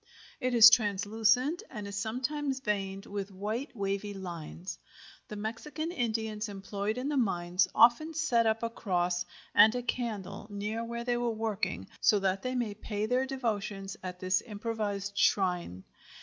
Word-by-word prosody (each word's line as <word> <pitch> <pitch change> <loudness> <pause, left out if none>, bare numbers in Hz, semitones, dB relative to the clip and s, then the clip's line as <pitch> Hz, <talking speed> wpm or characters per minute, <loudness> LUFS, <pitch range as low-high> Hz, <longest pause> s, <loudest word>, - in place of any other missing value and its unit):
It 255 -1 0
is 230 0 +11
translucent 225 - +2
and 210 -4 -6
is 200 - -6
sometimes 265 +6 -2
veined 195 -5 -2
with 200 -1 -4
white 215 +8 -4
wavy 200 0 -2
lines. 175 -1 -7 0.5
The 210 - -7
Mexican 280 +10 -4
Indians 220 -6 -2
employed 200 +2 -3
in 255 +2 -2
the 295 -1 0
mines 180 -6 +2
often 245 +8 +5
set 235 -8 +2
up 220 +1 +1
a 230 - 0
cross 175 -5 0 0.3
and 215 +3 +7
a 245 - -2
candle 215 -5 -3
near 210 +3 -3
where 235 0 -4
they 245 0 0
are 240 0 0
working, 215 - -2
so 210 - +5
that 195 -1 0
they 255 0 -2
may 235 -4 -1
pay 210 0 -3
their 250 +3 +1
devotions 210 -6 -3
at 180 -1 -6
this 185 0 +1
improvised 205 -2 -3
shrine. 180 - +1
215 Hz, 155 wpm, -30 LUFS, 195-240 Hz, 0.5 s, is